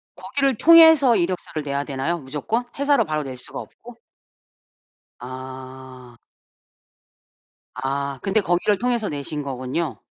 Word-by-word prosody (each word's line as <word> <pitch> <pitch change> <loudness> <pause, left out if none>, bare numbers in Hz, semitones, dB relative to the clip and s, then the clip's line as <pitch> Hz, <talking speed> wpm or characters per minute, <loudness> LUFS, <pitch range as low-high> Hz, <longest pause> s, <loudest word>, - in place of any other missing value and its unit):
거기를 265 +9 0
통해서 320 -7 +7
이력서를 175 -4 -2
내야 140 0 -2
되나요 145 +4 -2
무조건? 150 - -3
회사로 280 0 +2
바로 155 -1 -2
낼 130 -2 -7
수가 - - -9
없고? 235 0 -13 1.2
아. 130 -1 -10 1.6
아. 140 0 -3
근데 195 +2 +1
거기를 190 +3 +1
통해서 240 -2 -1
내신 145 +1 -5
거군요. 135 +4 -4
155 Hz, 255 characters per minute, -22 LUFS, 130-225 Hz, 1.6 s, 통해서